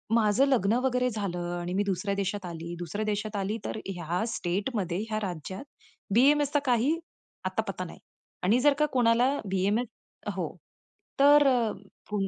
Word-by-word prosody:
माझं 220 +3 +4
लग्न 225 -6 +3
वगैरे 250 -1 +2
झालं 200 -5 -3 0.2
आणि 175 +1 -4
मी 200 - +2
दुसऱ्या 200 0 -1
देशात 200 0 -2
आली. 170 0 -6
दुसऱ्या 205 +5 -3
देशात 215 0 -2
आली 200 +3 -1
तर - - -3
ह्या 175 +1 -2
स्टेटमध्ये 185 0 -1
ह्या 215 -1 -1
राज्यात 180 - -6 0.5
बी-एम-एसचा 290 +3 +4
काही 255 +5 +2 0.5
अता-पता - - -2
नाही. - - -11 0.4
आणि 215 +7 +4
जर 290 0 +5
का 300 - +5
कोणाला 245 +1 +4 0.2
बी-एम-एस 205 +6 +1 0.5
हो, - - -3 0.6
तर, 290 +1 +7
अ, 240 -4 +3 0.4
फून 205 -2 0
210 Hz, 145 wpm, -28 LUFS, 190-250 Hz, 0.6 s, तर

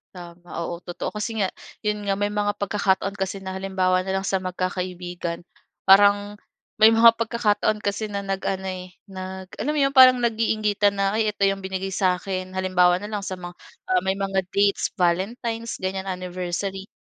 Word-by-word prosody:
Tama, 175 0 -12 0.2
oo. 170 0 -5
Totoo, 175 0 -5
kasi 215 +2 -4
nga, 190 - -1 0.3
'yon 210 -1 -2
nga. 195 - +2
May 205 +1 -1
mga 205 0 0
pagkakataon 200 -1 0
kasi 190 0 -3
na 190 - -5
halimbawa 185 -1 +1
na 190 +1 -2
lang 190 - -1
sa 190 -1 0
magkakaibigan, 180 -1 -4 0.4
parang 205 +1 +5 0.4
may 220 - +9
mga 230 0 +6
pagkakataon 215 -2 0
kasi 205 +2 -1
na 200 -1 -4
nag 195 -1 -2
ano 190 0 -2
eh, 185 -1 -6 0.2
nag, 190 0 -7
alam 300 +1 -1
mo - - +1
'yon, 275 - +2
parang 255 -2 +8
nag-iingitan 215 -3 +1
na, 195 +2 0
"Ay, 220 - +2
ito 200 - -1
'yong 195 0 +2
binigay 190 0 -4
sa'kin." 185 0 -1
Halimbawa 180 -1 +3
na 210 - -6
lang 205 -1 -3
sa 185 - -3
ma 175 -1 -8 0.4
ah, 370 - +4
may 190 0 -1
mga 195 -1 -1 0.2
dates, 200 0 +3
Valentines 225 +6 -1
ganyan, 190 +1 -3
Anniversary, 185 +1 -4
195 Hz, 175 wpm, -24 LUFS, 185-210 Hz, 0.4 s, may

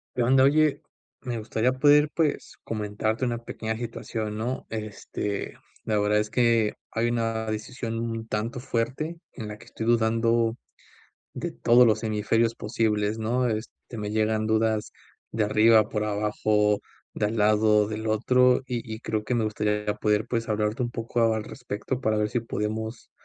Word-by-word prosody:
¿Qué 125 - +1
onda? 130 +2 +5
Oye, 150 +1 +3 0.4
me 125 -2 -4
gustaría 110 +2 0
poder, 145 +2 +5
pues, 160 -3 -1
comentarte 110 +2 -2
una 120 -1 -1
pequeña 110 -1 -5
situación, 110 -2 -4
¿no? 120 +4 -3
Este, 105 -2 -4 0.3
la 105 -1 0
verdad 105 +1 +2
es 105 0 -2
que 115 -2 +3 0.2
hay 115 +1 0
una 115 -1 -1
decisión 115 +1 -4
un 115 -1 -4
tanto 115 +4 -2
fuerte 135 +7 -2
en 110 -4 -7
la 105 0 -7
que 120 - -14
estoy 115 -1 -6
dudando 115 0 +2 0.8
de - - -3
todos 120 +1 +5
los 110 -1 +2
hemisferios 115 +2 +1
posibles, 105 -1 0
¿no? 120 +3 0
Este, 110 +1 -6
me 105 -1 -3
llegan 110 0 +1
dudas 110 -1 +1 0.4
de 115 - 0
arriba, 110 0 +5
por 105 0 -1
abajo, 105 0 +1 0.3
de 105 - 0
al 110 +2 -3
lado, 105 0 +4
del 110 +1 -4
otro 125 +4 +3
y 115 -3 -4
y 110 - -9
creo 110 -3 -2
que 125 - -1
me 115 -2 +1
gustaría 105 -1 -1
poder, 105 0 +1
pues, 115 -1 -2
hablarte 105 +2 -1
un 120 - -3
poco 115 -1 +1
al 110 - -2
respecto 125 +1 -5
para 110 -4 +1
ver 105 0 0
si 120 - 0
podemos, 110 0 -4
110 Hz, 165 wpm, -26 LUFS, 105-120 Hz, 0.8 s, onda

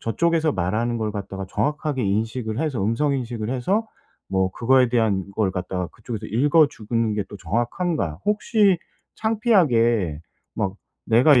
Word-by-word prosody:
저쪽에서 160 +6 +1
말하는 110 +6 -1
걸 110 -1 -2
갖다가 95 -2 -5
정확하게 145 +3 -1
인식을 110 +3 -1
해서 145 -9 -1
음성 140 +6 +1
인식을 120 -4 -3
해서 190 - 0 0.4
뭐 95 -1 +1
그거에 125 +4 +3
대한 110 -5 +1
거를 105 -4 +1
갖다가 90 -1 -3
그쪽에서 110 -1 -7
읽어주는 115 -4 +2
게 105 - 0
또 105 - -9
정확한가? 115 - -1
혹시 210 -2 +3 0.4
창피하게 120 - +2 0.3
막 95 -2 -1 0.3
'내가 125 +4 +6
115 Hz, 320 characters per minute, -23 LUFS, 105-150 Hz, 0.4 s, 내가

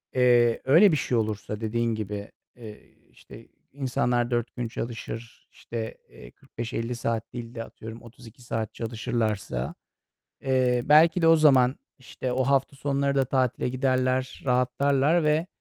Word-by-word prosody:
eee, 120 -2 +4
öyle 165 +9 +6
bir 155 - +2
şey 125 - 0
olursa 105 -1 -3
dediğin 115 +1 -1
gibi, 105 -1 -5 0.3
iii, 110 -3 -13
işte, - - -15 0.2
insanlar 125 -3 -1
4 120 -1 -2
gün 120 -2 -3
çalışır. 115 0 -7
İşte, 115 -1 -6
eee, - - -14
45-50 115 +1 -5
saat 115 -1 -3
değil 120 -1 -7
de, 115 - -4
atıyorum 115 0 -10
32 120 0 -15
saat 115 -3 -4
çalışırlarsa, 110 - -3 0.7
eee, 130 -2 +2
belki 160 +3 +5
de 165 - +4
o 165 - +7
zaman, 135 -4 +5 0.2
işte, 130 0 -5
o 130 +1 +1
hafta 135 +1 +1
sonları 140 0 -1
da 135 -1 +2
tatile 130 -1 0
giderler, 130 0 0
rahatlarlar 135 +5 +2
ve 155 +3 +1
125 Hz, 140 wpm, -26 LUFS, 115-135 Hz, 0.7 s, o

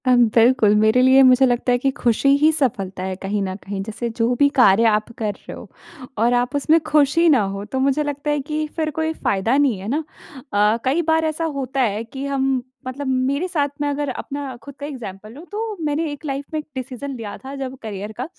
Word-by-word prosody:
अम, 245 -1 +6
बिल्कुल 230 -3 +5
मेरे 220 +4 +4
लिए 260 +1 +6
मुझे 255 0 +6
लगता 245 0 +1
है 245 - +3
कि 270 +2 0
ख़ुशी 240 +3 +2
ही 305 +2 +4
सफलता 200 -11 -1
है 190 0 -3
कहीं 200 +2 -3
न 185 -1 -3
कहीं 195 0 -4
जैसे 220 +3 -4
जो 230 +1 0
भी 285 +4 +4
कार्य 225 -3 +6
आप 215 +2 -3
कर 215 -2 -1
रहे - - -11
हो - - -11 0.5
और 235 +3 +2
आप 245 +3 0
उसमें 310 +3 +3
ख़ुश 295 0 +2
ही 335 +1 +5
ना 270 -7 +5
हो, 195 +1 -4
तो 260 +5 -3
मुझे 275 +3 +1
लगता 290 0 -3
है 295 - 0
कि 305 +2 -3
फिर 315 -2 -1
कोई 320 +2 -2
फ़ायदा 225 -2 0
नहीं 275 -7 +2
है 195 - -7
ना। 295 +7 -1 0.5
अ, 210 +2 +3
कई 280 +6 +2
बार 320 0 +2
ऐसा 315 +1 -2 0.2
होता 265 0 -2
है 220 -2 0
कि 265 +4 -7
हम 270 -2 0 0.3
मतलब 270 +2 -5
मेरे 265 +6 0
साथ 295 -6 0
में 290 - +1
अगर 285 0 -2
अपना 275 0 -5
खुद 280 -1 -11
का 285 - -7
एग्ज़ाम्पल 215 -7 -8
लूँ, 295 +6 -11
तो 430 0 -4
मैंने 300 +1 -1
एक 290 - -9
लाइफ़ 275 0 -3
में 310 - 0
एक 305 - -8
डिसीजन 260 +2 -5
लिया 220 -4 -7
था 270 +1 -9
जब 265 -1 -5
करियर 210 -1 -6
का, 250 - -3
260 Hz, 230 wpm, -21 LUFS, 225-290 Hz, 0.5 s, अम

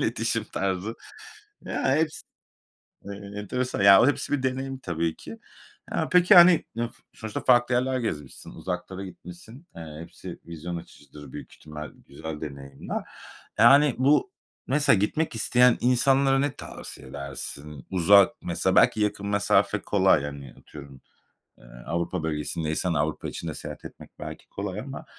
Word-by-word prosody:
iletişim - - 0
tarzı. 95 +3 -3 0.7
Ya, 130 - 0
heps 155 -1 -1 0.8
e 100 - -7 0.3
enteresan 125 +4 -3
ya, 100 -1 +9
o, - - +5
hepsi 145 - 0
bir 140 -2 0
deneyim 130 +1 -2
tabii 85 -6 -2
ki. 225 - -11 0.5
Ya - - -1
peki, 180 0 +6
hani, 175 -1 +8
ı 120 0 -1 0.2
sonuçta 110 -1 -6
farklı 120 -1 +4
yerler 130 +1 0
gezmişsin, 75 - -5
uzaklara 95 +1 -5
gitmişsin, 95 - -12
eee, 80 -2 -9
hepsi 85 - -10
vizyon 85 +1 -6
açıcıdır 75 -3 -13
büyük - - -9
ihtimal, 75 0 -9 0.2
güzel 80 +2 -7
deneyimler. 70 -2 -6 0.6
Ya, - - +9
hani, 140 -1 +5
bu 145 - +3 0.4
mesela 145 -4 +3
gitmek 135 +9 -1
isteyen 125 +2 +4
insanlara 135 +2 +3
ne 140 0 -1
tavsiye - - -9
edersin? 70 +1 -7
Uzak, 95 +2 +5
mesela - - 0
belki 110 - +4
yakın 100 -1 -1
mesafe 100 0 +2
kolay, - - +3
hani, 70 -3 -7
atıyorum, 70 -3 -13 0.6
eee, - - -19 0.2
Avrupa 85 -1 -2
bölgesindeysen, 80 +2 -2
Avrupa 75 0 -1
içinde - - -5
seyahat - - -8
etmek - - -11
belki - - -9
kolay 100 0 -5
ama 135 +3 -8
100 Hz, 140 wpm, -26 LUFS, 80-130 Hz, 0.8 s, ya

